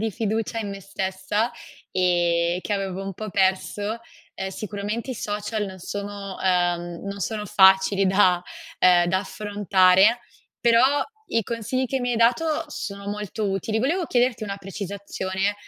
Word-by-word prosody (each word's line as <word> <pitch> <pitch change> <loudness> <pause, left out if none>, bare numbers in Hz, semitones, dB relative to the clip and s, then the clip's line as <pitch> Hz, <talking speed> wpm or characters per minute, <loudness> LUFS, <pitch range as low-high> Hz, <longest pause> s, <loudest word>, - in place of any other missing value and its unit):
di 220 0 0
fiducia 220 +2 -2
in 205 -2 -3
me 195 0 -7
stessa, 190 +4 -2 0.4
e 175 -1 +2
che 210 - -3
avevo 195 -1 -2
un 195 0 -5
po' 215 +2 -6
perso. 205 +3 0 0.3
Ehm, 190 - -4
sicuramente 210 +5 -4
i - - -3
social 210 0 -3
non 190 -2 -8
sono 200 +1 -6
uhm, 175 -1 0
non 200 0 -5
sono 210 +2 -2
facili 190 +1 +5
da 185 -2 +4 0.4
ehm, 175 -1 +5
da 185 +2 +2
affrontare, 200 +1 +3 0.4
però 245 +5 +4 0.3
i 230 - +1
consigli 235 +4 -2
che 265 +2 -1
mi 245 0 -1
hai 240 - 0
dato 250 +8 +2
sono 200 0 -6
molto 210 0 -3
utili. 195 +3 -1
Volevo 325 +10 +1
chiederti 245 -2 +1
una 200 -1 -4
precisazione, 195 0 -3
200 Hz, 150 wpm, -24 LUFS, 190-220 Hz, 0.4 s, facili